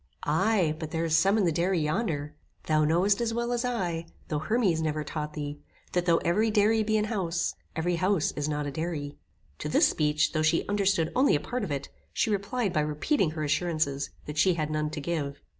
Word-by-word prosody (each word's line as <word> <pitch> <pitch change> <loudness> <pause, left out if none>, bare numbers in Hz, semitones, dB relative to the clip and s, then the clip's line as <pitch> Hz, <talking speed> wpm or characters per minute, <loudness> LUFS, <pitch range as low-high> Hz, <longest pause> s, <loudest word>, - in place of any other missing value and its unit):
"Aye, 175 0 +2
but 160 -2 -5
there 165 +1 -1
is 160 -1 +2
some 195 +5 +4
in 205 - +3
the 170 - +3
dairy 175 +3 +1
yonder. 150 -2 -1 0.3
Thou 155 -1 +2
knowest 185 +7 +2
as 230 -1 -1
well 235 +1 -1
as 240 0 0
I, 180 -9 -2 0.2
though 150 - 0
Hermes 185 -1 +1
never 155 -1 -1
taught 150 0 -5
thee, 145 -1 -5 0.3
that 180 0 0
though 165 -1 +5
every 210 +6 +2
dairy 215 +1 +3
be 215 0 +1
an 210 - +1
house, 180 -6 -1 0.2
every 170 +2 0
house 185 -2 +1
is 145 +1 -3
not 150 -1 -2
a 145 - -3
dairy." 150 -1 -4 0.4
To - - -3
this - - +5
speech, 150 -1 +1
though 155 - 0
she 155 +2 +2
understood 200 -5 +1
only 265 - +4
a - - +1
part 245 +10 -3
of 200 - -3
it, 140 -1 -3 0.2
she 225 - +1
replied 205 0 -1
by 155 - +2
repeating 150 - +1
her 155 - -1
assurances, 150 -2 0 0.2
that 150 0 -4
she 185 0 +4
had 155 -2 -2
none 155 0 -1
to 150 0 -5
give. 145 -3 -3
165 Hz, 215 wpm, -28 LUFS, 150-200 Hz, 0.4 s, though